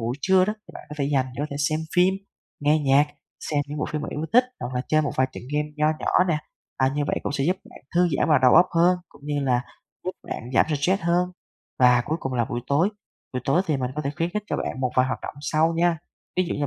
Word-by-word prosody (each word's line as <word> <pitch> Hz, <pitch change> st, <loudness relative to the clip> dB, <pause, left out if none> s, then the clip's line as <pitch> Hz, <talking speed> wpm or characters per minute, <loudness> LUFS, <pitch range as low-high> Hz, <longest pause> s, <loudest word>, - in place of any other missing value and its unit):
buổi 115 Hz, +3 st, -2 dB
trưa 190 Hz, +1 st, +4 dB
đó, 210 Hz, -, -1 dB
thì 215 Hz, -, -18 dB
bạn -, -, -9 dB
có 150 Hz, -, -7 dB
thể 140 Hz, -, +1 dB
dành 130 Hz, -2 st, +2 dB
để 130 Hz, -, -5 dB
có -, -, -1 dB
thể 140 Hz, -, -4 dB
xem 155 Hz, 0 st, -1 dB, 0.2 s
phim, 180 Hz, +2 st, +5 dB, 0.5 s
nghe 150 Hz, +2 st, +3 dB
nhạc, 140 Hz, 0 st, +4 dB, 0.4 s
xem 145 Hz, -2 st, +2 dB
những 150 Hz, +1 st, -5 dB
bộ 150 Hz, -, 0 dB
phim 150 Hz, -1 st, -3 dB
bạn -, -, -5 dB
yêu 155 Hz, +2 st, -3 dB
thích, 250 Hz, +2 st, +6 dB, 0.2 s
hoặc 125 Hz, -, -4 dB
là 125 Hz, -, 0 dB
chơi 155 Hz, 0 st, +3 dB
một 145 Hz, -, -1 dB
vài 130 Hz, -, +3 dB
trận -, -, -8 dB
game 150 Hz, 0 st, 0 dB
nho 150 Hz, 0 st, +2 dB
nhỏ 180 Hz, -, +3 dB
nè. 155 Hz, -3 st, +2 dB, 0.4 s
À, 130 Hz, -, +3 dB
như 145 Hz, -, +1 dB
vậy -, -, 0 dB
cũng -, -, -2 dB
sẽ 140 Hz, -1 st, 0 dB
giúp 180 Hz, +5 st, +2 dB
bạn -, -, -14 dB
thư 175 Hz, +1 st, +4 dB
giãn -, -, +2 dB
và 150 Hz, -, +5 dB
đầu 125 Hz, -, +6 dB
óc 180 Hz, -, +7 dB
hơn, 180 Hz, +2 st, +4 dB
cũng 145 Hz, -, -20 dB
như 145 Hz, -1 st, -1 dB
là 125 Hz, -2 st, +2 dB, 0.4 s
giúp 185 Hz, -, -1 dB, 0.2 s
bạn 120 Hz, -, -5 dB
giảm -, -, +5 dB
stress 160 Hz, +6 st, +1 dB
hơn. 175 Hz, +2 st, +2 dB, 0.5 s
Và 125 Hz, -1 st, +5 dB
cuối 155 Hz, -, -1 dB
cùng 135 Hz, -, -3 dB
là 120 Hz, -1 st, +2 dB
buổi 120 Hz, +2 st, -4 dB
tối, 165 Hz, +8 st, +2 dB, 0.4 s
buổi 125 Hz, -, -2 dB
tối 165 Hz, +7 st, +3 dB
thì 155 Hz, -, +1 dB
mình 125 Hz, -2 st, -2 dB
có 150 Hz, -, -1 dB
thể 140 Hz, -, -1 dB
khuyến 165 Hz, +1 st, -1 dB
khích 210 Hz, +3 st, -2 dB
cho -, -, -2 dB
bạn 130 Hz, -, -3 dB
một 130 Hz, -1 st, 0 dB
vài 130 Hz, 0 st, +5 dB
hoạt 130 Hz, -, -3 dB
động -, -, -6 dB
sau 155 Hz, +3 st, +2 dB
nha. 170 Hz, -1 st, +2 dB, 0.4 s
Ví 185 Hz, -, +3 dB
dụ -, -, -2 dB
như 145 Hz, -, -1 dB
150 Hz, 280 wpm, -24 LUFS, 135-170 Hz, 0.5 s, óc